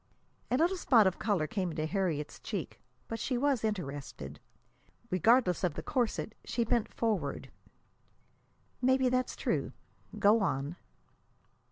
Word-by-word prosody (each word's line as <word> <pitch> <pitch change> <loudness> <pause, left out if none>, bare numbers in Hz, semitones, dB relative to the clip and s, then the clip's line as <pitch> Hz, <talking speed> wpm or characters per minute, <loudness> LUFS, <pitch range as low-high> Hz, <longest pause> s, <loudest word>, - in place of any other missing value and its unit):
A 250 - +2
little 345 +5 +2
spot 235 - +5
of 190 -1 +1
color 200 -8 +1
came 185 +3 -2
into 155 -1 -2
Harriet's 160 -4 -2
cheek. 195 - -5 0.3
But 225 - -4
she 255 - -1
was 275 -3 +1
interested. 140 - -4 0.7
Regardless 185 0 +4
of 175 -5 +1
the - - -5
corset, 240 -4 -1
she 235 - -1
bent 230 -1 +1
forward. 200 -12 -2 1.3
"Maybe 260 0 +4
that's 255 0 0
true. - - -1 0.4
Go 210 +3 +5
on." 145 -2 -1
205 Hz, 130 wpm, -31 LUFS, 160-245 Hz, 1.3 s, spot